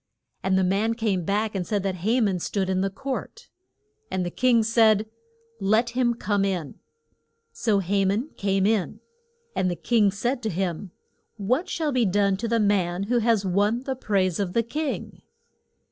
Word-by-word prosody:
And 190 0 +1
the 190 - +3
man 205 +5 +1
came 205 -7 -1
back 210 +3 0
and 185 -3 -3
said 205 -3 -1
that 190 -2 -2
Ha 220 +8 +1
man 195 -5 +1
stood 190 +2 -1
in 185 0 +1
the 195 - 0
court. 275 - -6 0.6
And 185 -1 -1
the 175 - -3
king 245 0 +3
said, 220 -1 +4 0.5
Let 220 +4 +2
him 240 -1 +1
come 205 -3 0
in. 180 -7 -3 0.7
So 210 -3 +1
Ha 195 +2 +1
man 210 +10 0
came 195 -1 +1
in. 210 -3 0 0.6
And 185 - +1
the 175 - -2
king 215 +1 +2
said 240 +6 -2
to 220 - -2
him, 185 0 -3 0.5
What 250 - 0
shall 315 -3 -1
be 250 -3 +2
done 200 +1 +2
to 230 +4 -3
the 230 0 +1
man 195 -3 +1
who 240 +4 +1
has 225 -3 +2
won 205 +6 +1
the 265 -1 -3
praise 195 -7 0
of 190 -3 -2
the 230 - +2
king? 295 +6 -4
205 Hz, 180 wpm, -25 LUFS, 190-230 Hz, 0.7 s, said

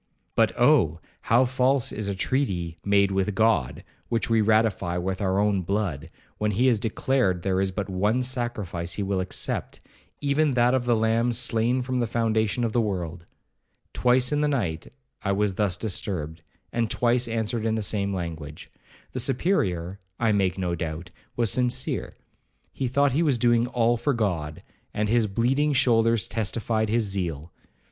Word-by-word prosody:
But - - +3
Oh! - - +4 0.3
how 120 +3 +5
false 130 +1 +1
is 105 -1 -4
a 100 - -2
treaty 90 - -1
made 100 -1 +3
with 95 +1 0
God, 110 - +1 0.3
which 115 0 -1
we 115 -1 +4
ratify 110 -5 +1
with 95 +3 -3
our 95 -1 +1
own 100 -1 +2
blood, 85 -5 -2 0.3
when 105 - +1
he 120 +7 +2
has 120 -5 +3
declared 110 -4 0
there 95 -1 +1
is 95 - 0
but 95 +1 -4
one 105 +6 0
sacrifice 110 -9 -2
he 100 - -2
will 95 -1 -1
accept, 95 0 -2 0.4
even 145 0 +1
that 120 +1 +3
of 130 -2 +1
the 120 -1 +3
Lamb 115 +2 +1
slain 120 +1 +1
from 130 0 -2
the 120 - 0
foundation 110 0 0
of 115 -2 -1
the 120 - +3
world! 90 -5 -4 0.7
Twice 125 +1 +2
in 150 0 +1
the 150 - +2
night, 95 - -2 0.3
I 100 - 0
was 100 0 +1
thus 95 -2 0
disturbed, 85 -6 -3 0.3
and 115 -2 0
twice 120 +1 +1
answered 115 0 -2
in 110 0 0
the 110 - -1
same 100 -1 0
language. 80 -5 -6 0.4
The 130 - -4
Superior, 100 - -1 0.2
I 115 -2 +2
make 95 -3 +1
no 90 -2 -1
doubt, 85 +2 -5 0.2
was 115 -4 +1
sincere. 125 -1 -1 0.6
He 130 - -2
thought 140 +3 +2
he 145 +6 +1
was 145 -7 +2
doing 120 0 +3
all 120 -1 +1
for 140 +3 0
God, 85 -9 -2 0.3
and 105 0 0
his 115 -1 +3
bleeding 130 +9 +1
shoulders 115 -5 +3
testified 110 +1 -1
his 115 +1 +2
zeal. 85 -6 -3
110 Hz, 170 wpm, -25 LUFS, 95-120 Hz, 0.7 s, how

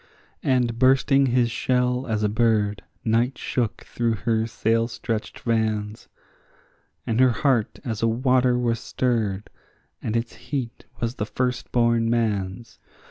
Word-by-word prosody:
And 125 -3 +1
bursting 135 +1 +4
his 120 -1 +2
shell 125 +1 0
as 110 -2 -1
a - - +3
bird, 105 -2 +1 0.2
night 120 +3 +1
shook 120 -4 -2
through 115 -1 -1
her 110 +2 0
sail 115 0 +1
stretched 115 -2 -4
vans, 110 -2 -1 1.0
And 115 +1 0
her 130 0 +6
heart 120 -1 +1
as 110 -4 -3
a 115 - +3
water 125 +1 +2
was 120 -2 0
stirred, 110 -6 -1 0.5
and 115 0 -1
its 115 0 -3
heat 125 -1 -5
was 115 0 -1
the 105 - -1
firstborn 120 0 +1
man's. 110 -1 -2
115 Hz, 135 wpm, -24 LUFS, 110-125 Hz, 1.0 s, her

